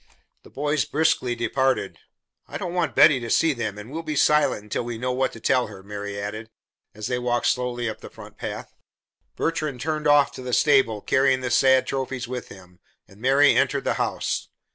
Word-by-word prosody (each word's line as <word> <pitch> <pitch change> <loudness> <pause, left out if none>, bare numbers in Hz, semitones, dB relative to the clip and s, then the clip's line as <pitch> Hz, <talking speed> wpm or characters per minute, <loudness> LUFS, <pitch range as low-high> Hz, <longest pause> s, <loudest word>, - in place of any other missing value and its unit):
The - - -17
boys 145 +1 -1
briskly 150 -6 0
departed. 130 +3 -1 0.5
"I - - -6
don't 175 - -5
want 175 -5 -1
Betty 140 -5 +6
to 120 -1 -6
see 165 +4 +3
them, 110 -5 -4
and 105 +4 -10
we'll 160 +3 -4
be 155 -2 -4
silent 150 -7 +3
until 105 - -3
we 120 -1 -5
know 125 +2 -2
what 130 +1 0
to 115 - -10
tell 125 +2 +1
her," 100 -3 -12
Mary 100 0 -6
added, 110 +2 -6 0.5
as 110 0 -6
they 125 +1 -1
walked 120 0 -1
slowly 125 -1 0
up 110 - -6
the - - -10
front - - -13
path. - - -7 0.6
Bertrand 155 -5 -2
turned 155 0 -2
off 145 -1 +5
to - - -9
the 125 -1 -5
stable, 130 -8 +3
carrying 130 +1 +2
the 125 -1 -3
sad 130 +1 +4
trophies 130 -2 -3
with 125 0 -5
him, 90 -2 -15 0.3
and 100 +2 -19
Mary 135 +3 +5
entered - - +1
the - - 0
house. - - -2
125 Hz, 200 wpm, -24 LUFS, 115-145 Hz, 0.6 s, Betty